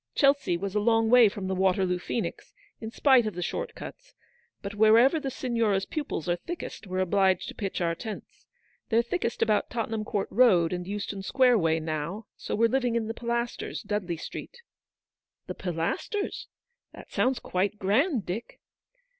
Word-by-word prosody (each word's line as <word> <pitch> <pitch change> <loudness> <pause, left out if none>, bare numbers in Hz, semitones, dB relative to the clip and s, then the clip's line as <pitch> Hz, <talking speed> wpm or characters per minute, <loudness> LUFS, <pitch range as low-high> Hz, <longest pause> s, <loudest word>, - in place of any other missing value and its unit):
Chelsea 275 -11 +3
was 195 +2 -4
a 210 - +2
long 225 +1 +2
way 245 -3 +8
from 200 -1 -6
the 190 - -1
Waterloo 185 -1 +1
Phcenix, 230 +5 -4 0.3
in 220 - -6
spite 255 -1 +4
of 210 - -4
the 180 - -3
short 485 - -4
cuts; - - -10 0.5
but 200 0 -5
wherever 225 +8 +5
the 275 - -3
Signora's 230 -7 0
pupils 290 - -4
are 175 0 +1
thickest, 340 - -7
we're 185 0 -4
obliged 190 0 +2
to - - -7
pitch 195 -3 -4
our 170 -1 +1
tents. 215 +4 -9 0.4
They're 230 0 +3
thickest 235 -3 -1
about 215 -2 +1
Tottenham 225 -2 -2
court 205 -2 -2
Road 185 -8 +4
and 180 0 -4
Euston 200 0 -4
Square 250 +2 +3
way 165 -2 +2
now: 160 +6 -4
so - - -4
we're 230 +2 +4
living 245 -1 0
in 230 -1 0
the 225 - -3
Pilasters, 235 0 -3
Dudley 200 -5 -2
Street." 475 - -8 0.4
'? - - -66
The - - -5
Pilasters! 180 - -3 0.5
That - - -13
sounds 260 0 +1
quite 195 +3 -1
grand, 230 - +1
Dick." 195 +6 -6
215 Hz, 170 wpm, -27 LUFS, 190-240 Hz, 0.5 s, way